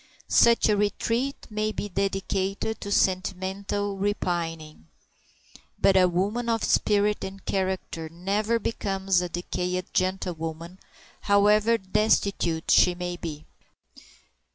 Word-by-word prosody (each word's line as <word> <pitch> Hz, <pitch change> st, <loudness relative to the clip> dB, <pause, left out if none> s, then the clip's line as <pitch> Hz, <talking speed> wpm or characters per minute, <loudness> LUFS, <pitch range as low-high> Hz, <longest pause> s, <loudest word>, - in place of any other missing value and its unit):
Such 235 Hz, 0 st, +5 dB
a 210 Hz, -, +3 dB
retreat 230 Hz, +6 st, -1 dB
may 215 Hz, 0 st, -1 dB
be 205 Hz, -, -4 dB
dedicated 195 Hz, +2 st, -2 dB
to 205 Hz, -, -5 dB
sentimental 195 Hz, +2 st, -1 dB
repining. 165 Hz, -, -3 dB, 0.9 s
But 195 Hz, -, +4 dB
a 185 Hz, -1 st, +6 dB
woman 205 Hz, +7 st, -1 dB
of 225 Hz, -1 st, 0 dB
spirit 210 Hz, 0 st, +2 dB
and 195 Hz, 0 st, -8 dB
character 185 Hz, -4 st, -2 dB
never 200 Hz, +7 st, -1 dB
becomes 195 Hz, -4 st, 0 dB
a 180 Hz, -, -3 dB
decayed 180 Hz, +1 st, -3 dB
gentlewoman, 175 Hz, -2 st, -3 dB, 0.4 s
however 210 Hz, +3 st, +4 dB
destitute 190 Hz, -4 st, 0 dB
she 180 Hz, -, +5 dB
may 175 Hz, 0 st, -4 dB
be. 155 Hz, -3 st, -7 dB
195 Hz, 105 wpm, -26 LUFS, 180-205 Hz, 0.9 s, a